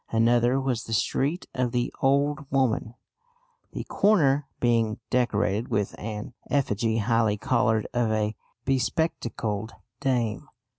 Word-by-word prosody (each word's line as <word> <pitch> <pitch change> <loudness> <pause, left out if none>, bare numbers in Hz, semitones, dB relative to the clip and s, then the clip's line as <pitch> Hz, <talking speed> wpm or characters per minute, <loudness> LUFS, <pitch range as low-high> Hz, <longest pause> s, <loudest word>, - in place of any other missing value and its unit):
Another 120 +3 +3
was 130 -4 -1
the 115 - -5
street 145 +9 0
of 125 -2 0
the 120 0 -1
"old 140 +1 +1
woman," 125 -4 0 0.8
the - - -4
corner 145 -9 +3
being 115 -3 +2
decorated 110 -2 +1
with 105 -1 -1
an 105 +1 -5 0.2
effigy, 115 -5 +1
highly 110 -1 +2
coloured, 115 -2 +1
of 120 -2 +1
a 110 0 0 0.3
bespectacled 120 - -1 0.3
dame. 120 -6 -1
120 Hz, 115 wpm, -26 LUFS, 110-135 Hz, 0.8 s, Another